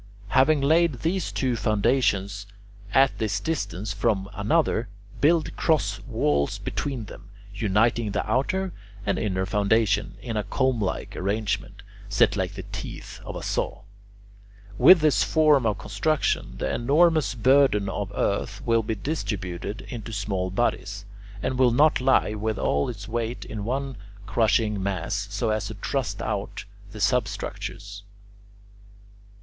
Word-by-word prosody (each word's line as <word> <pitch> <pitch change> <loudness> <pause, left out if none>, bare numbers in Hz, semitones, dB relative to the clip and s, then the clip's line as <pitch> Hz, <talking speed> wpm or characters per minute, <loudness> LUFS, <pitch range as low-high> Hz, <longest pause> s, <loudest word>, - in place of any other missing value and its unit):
Having 140 +5 +4
laid 155 -2 +3
these 175 +2 -1
two 130 -3 0
foundations 100 -3 +1 0.4
at 135 +4 +4
this 105 -1 0
distance 105 - -3
from 105 -1 +1
one 100 - -13
another, 115 0 +1 0.3
build 160 +2 +2
cross 160 -3 +1
walls 70 -1 +1
between 130 -6 -3
them, 100 - -12 0.2
uniting 110 +2 +1
the 100 - -2
outer 185 - 0 0.3
and - - 0
inner 95 -3 -1
foundation, 105 0 +1
in 115 +2 -5
a 105 - 0
comb 130 -2 0
like 95 - -3
arrangement, 100 +2 -2 0.3
set - - +3
like - - -2
the - - -6
teeth - - -7
of - - -7
a - - -6
saw. - - -2 0.9
With 155 - +8
this 155 -2 +4
form 150 -6 +4
of 105 -3 0
construction, 105 +9 -1
the - - -2
enormous 155 +3 +3
burden 125 -3 +4
of 100 0 -3
earth 100 - -1
will 115 -1 +3
be 110 0 -3
distributed 100 - -4
into 115 -3 -7
small 95 -3 -2
bodies, 100 -1 -1 0.4
and 130 - -1
will 130 -1 +6
not 145 +4 +4
lie 130 -4 +3
with 110 0 -2
all 70 0 +1
its 105 -4 -7
weight 115 +1 -3
in 105 -2 -5
one 135 +1 -2 0.3
crushing 110 -2 +1
mass 100 +2 -2
so 105 +1 -1
as 110 -2 -1
to - - -7
thrust - - -3
out - - -3 0.3
the - - -9
substructures. 100 0 -2
110 Hz, 140 wpm, -25 LUFS, 100-135 Hz, 0.9 s, With